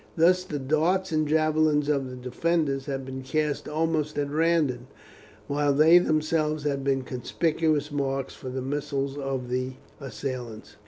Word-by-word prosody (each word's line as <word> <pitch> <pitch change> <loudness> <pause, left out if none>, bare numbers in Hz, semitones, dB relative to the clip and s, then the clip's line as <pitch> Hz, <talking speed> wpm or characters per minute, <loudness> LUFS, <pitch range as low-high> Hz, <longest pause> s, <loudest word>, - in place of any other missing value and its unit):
Thus 180 +3 +4
the 150 -5 -4
darts 155 +8 +1
and 155 -1 +1
javelins 155 -1 +2
of 140 -3 0
the 125 - -7
defenders 135 +2 -1
had 135 -2 -3
been 130 0 -6
cast 150 +2 -1
almost 155 -1 -1
at 145 -1 -1
random, 150 -6 +1 0.6
while 145 0 +1
they 160 +5 +7
themselves 155 -2 0
had 140 -2 -1
been 135 -1 +1
conspicuous 150 +4 0
marks 135 -2 -2
for 130 - -8
the 130 0 -4
missiles 140 0 -2
of 135 -3 -3
the 130 +1 -2 0.3
assailants. 120 -4 -6
145 Hz, 150 wpm, -26 LUFS, 135-155 Hz, 0.6 s, they